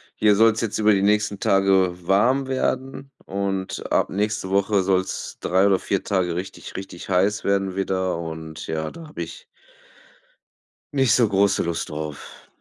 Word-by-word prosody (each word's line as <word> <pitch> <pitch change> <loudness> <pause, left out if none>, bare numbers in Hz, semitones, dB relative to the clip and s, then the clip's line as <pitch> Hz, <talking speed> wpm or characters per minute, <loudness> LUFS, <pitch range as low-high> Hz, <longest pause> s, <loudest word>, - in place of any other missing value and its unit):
hier 105 -1 +4
soll's 115 +1 +4
jetzt 115 -3 -2
über 105 0 +4
die 95 - +2
nächsten 105 0 +1
Tage 95 -2 +3
warm 125 +8 +3
werden 135 +1 -2
und 95 -1 -3
ab - - +2
nächste 105 -1 -2
Woche 100 0 +2
soll's 95 0 -1
3 95 +2 +2
oder 95 -2 +3
4 100 +1 -2
Tage 90 -4 0
richtig, 95 +2 -7
richtig 95 -1 -8
heiß 95 +3 +2
werden 95 -1 0
wieder 95 -2 -1
und 80 -1 -7
ja, 80 -1 -3
da 165 -1 -11
habe 150 - -6
ich 485 - -10 1.5
nicht 135 -5 +3
so 120 -3 +4
große 100 0 +2
Lust 85 -1 -3
drauf. 75 -1 -7
95 Hz, 155 wpm, -23 LUFS, 95-105 Hz, 1.5 s, hier